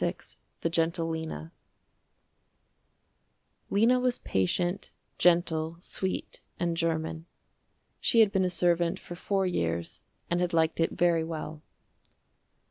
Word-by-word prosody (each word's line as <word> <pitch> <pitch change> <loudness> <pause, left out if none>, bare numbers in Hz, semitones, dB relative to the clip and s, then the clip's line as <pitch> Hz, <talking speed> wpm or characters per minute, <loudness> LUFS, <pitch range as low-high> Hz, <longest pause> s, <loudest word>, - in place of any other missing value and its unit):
FINIS - - -3 0.2
THE 165 - 0
GENTLE 165 0 +1
LENA 160 0 -5 2.2
Lena 230 +5 +4
was 250 -1 +1
patient, 175 - -1 0.3
gentle, 170 -2 +3
sweet 185 +1 -3 0.2
and 170 -1 0
german. 160 0 -2 0.7
She 230 - +5
had 210 -3 +5
been 195 -2 +2
a 185 - +2
servant 175 -1 +2
for - - -9
four 195 +2 0
years 85 - -2 0.3
and 175 +1 0
had 180 0 0
liked 160 0 +2
it 165 - +1
very 170 -2 +2
well. 155 -1 -6
170 Hz, 120 wpm, -29 LUFS, 160-180 Hz, 2.2 s, She